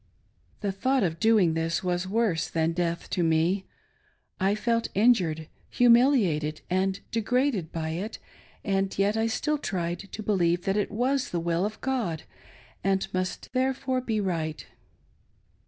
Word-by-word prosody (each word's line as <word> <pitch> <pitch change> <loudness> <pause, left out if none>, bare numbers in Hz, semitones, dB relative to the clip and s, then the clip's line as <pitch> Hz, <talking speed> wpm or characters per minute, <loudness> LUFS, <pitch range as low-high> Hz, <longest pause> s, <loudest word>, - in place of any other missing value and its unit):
The 200 -2 0
thought 255 +6 +1
of 165 -2 -1
doing 215 -7 +4
this 165 +2 -1
was 180 0 -1
worse 205 -5 0
than 160 0 +1
death 170 -1 -2
to 180 - 0
me. 170 +4 +1 0.7
I 195 +1 +2
felt 230 +1 0
injured, 180 -8 +3 0.2
humiliated 235 - +3
and 190 +1 +1
degraded 230 - 0
by 160 -1 -3
it, 185 +8 -4 0.5
and 195 -1 0
yet 200 +2 +2
I 225 0 +1
still 300 +6 -1
tried 175 -7 -2
to 205 +2 -8
believe 175 -4 +1
that 195 - +1
it 210 - 0
was 255 +5 0
the 175 - -2
will 170 +2 0
of 215 0 -9
God, 235 - -2 0.6
and 195 0 +1
must 185 +5 -3
therefore 260 0 0
be 225 -4 -1
right. 165 -6 -2
195 Hz, 145 wpm, -27 LUFS, 170-230 Hz, 0.7 s, doing